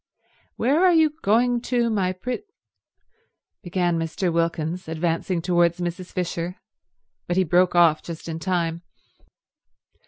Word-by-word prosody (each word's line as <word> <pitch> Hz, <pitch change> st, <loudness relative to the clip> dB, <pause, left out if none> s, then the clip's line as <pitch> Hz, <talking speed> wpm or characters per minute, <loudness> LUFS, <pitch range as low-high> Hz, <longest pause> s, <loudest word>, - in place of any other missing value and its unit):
"Where 285 Hz, +9 st, +2 dB
are 365 Hz, -1 st, +6 dB
you 320 Hz, -2 st, +4 dB
going 240 Hz, +3 st, +2 dB
to, 240 Hz, -1 st, 0 dB
my 190 Hz, -4 st, +1 dB
prett—" 250 Hz, -, -5 dB, 1.2 s
began 175 Hz, -2 st, 0 dB
Mr. 165 Hz, +2 st, -2 dB
Wilkins, 165 Hz, +1 st, -1 dB
advancing 165 Hz, +2 st, -1 dB
towards 175 Hz, -1 st, +2 dB
Mrs. 175 Hz, +1 st, -4 dB
Fisher; 175 Hz, 0 st, -3 dB, 0.7 s
but 175 Hz, -, -1 dB
he 190 Hz, -, +4 dB
broke 180 Hz, +1 st, +2 dB
off 170 Hz, -3 st, +5 dB
just 170 Hz, -1 st, -8 dB
in 165 Hz, -1 st, -4 dB
time. 170 Hz, -2 st, -1 dB
175 Hz, 125 wpm, -23 LUFS, 170-200 Hz, 1.2 s, are